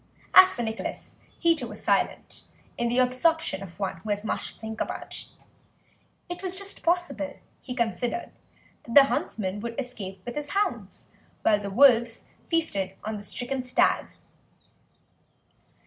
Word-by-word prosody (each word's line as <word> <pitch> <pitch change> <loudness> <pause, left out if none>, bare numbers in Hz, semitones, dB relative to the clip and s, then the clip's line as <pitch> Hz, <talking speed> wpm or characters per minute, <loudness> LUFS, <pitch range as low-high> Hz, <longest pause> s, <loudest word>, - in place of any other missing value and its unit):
As 375 0 +10
for 240 - -3
Nicholas, 220 0 -5 0.2
he, 335 -1 +4
too, 255 -6 -5
was - - -10
silent, - - 0 0.3
in 235 - 0
the 240 +1 +1
absorption 255 - +2
of 195 -1 -10
one 195 -2 -2
who 215 - -9
has 205 +1 -1
much - - -3
to - - -25
think 220 0 -5
about; - - -4 1.0
it 350 0 -6
was 375 -1 -1
just 395 +1 -1
possible, 335 -4 0 0.3
he 250 - -6
considered, 240 +5 -1 0.5
that 230 - -7
the 285 - +11
huntsman 205 -7 -2
would 230 +3 -5
escape 195 -8 -6
with 240 - -4
his 295 -1 -4
hounds 415 - -2 0.4
while 210 -1 +4
the 200 -1 -5
wolves 235 0 +5 0.3
feasted 200 - 0
on 215 0 -3
the - - -7
stricken 250 +5 -2
stag. 250 0 +2
245 Hz, 150 wpm, -27 LUFS, 215-295 Hz, 1.0 s, the